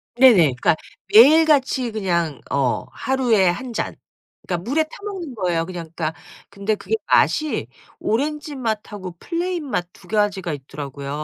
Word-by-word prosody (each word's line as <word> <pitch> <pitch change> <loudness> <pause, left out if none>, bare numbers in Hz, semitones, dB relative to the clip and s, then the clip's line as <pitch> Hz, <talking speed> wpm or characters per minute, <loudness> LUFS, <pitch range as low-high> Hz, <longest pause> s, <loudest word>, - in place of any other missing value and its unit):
네네. 250 -2 +8 0.2
그러니까 130 - +2 0.4
매일 300 +9 +8
같이 265 -5 +2
그냥 170 -8 -1
어 135 -3 0
하루에 245 -7 +2
1 245 +7 -3
잔, - - -3 0.5
그러니까 175 -2 -2
물에 315 +5 +2
타 315 - -15 0.2
먹는 355 - -6
거예요 175 -4 0
그냥 170 -3 -7
그러니까 155 -2 -3 0.3
근데 200 +2 -1
그게 325 - -2
맛이 305 -1 +2 0.3
오렌지 295 +5 -2
맛하고 210 -7 -4
플레인 340 -3 -3
맛 175 -7 -1
2 180 - -18
가지가 200 -5 0
있더라고요. 140 0 -7
215 Hz, 315 characters per minute, -21 LUFS, 175-275 Hz, 0.5 s, 네네